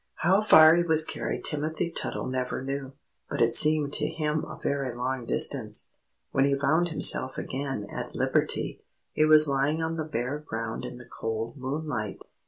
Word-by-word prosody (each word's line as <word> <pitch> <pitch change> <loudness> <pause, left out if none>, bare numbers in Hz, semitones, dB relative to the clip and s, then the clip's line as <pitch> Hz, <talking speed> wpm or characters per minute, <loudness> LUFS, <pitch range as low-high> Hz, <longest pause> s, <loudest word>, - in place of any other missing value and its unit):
How 190 +5 +2
far 160 -6 +7
he 175 - +2
was 160 -2 +4
carried - - -4
Timothy 155 +3 -1
Tuttle - - -1
never 130 0 -3
knew, 135 0 -5 0.4
but - - -4
it 115 0 +3
seemed 150 +1 +3
to 150 - -1
him 155 -1 -2
a - - -9
very 135 -4 -2
long 125 0 -3
distance. - - -1 0.4
When 135 - +2
he 140 0 +2
found 155 +5 +2
himself 130 -4 +3
again 135 -5 -4
at - - -6
liberty, - - -1 0.3
he 155 - +2
was 155 0 +7
lying 140 +3 0
on 160 0 -3
the 155 - -2
bare 140 -1 -3
ground 115 -5 -5
in 125 0 -7
the 120 - -12
cold 115 0 -5
moonlight. 130 -6 -4
140 Hz, 175 wpm, -27 LUFS, 125-155 Hz, 0.4 s, far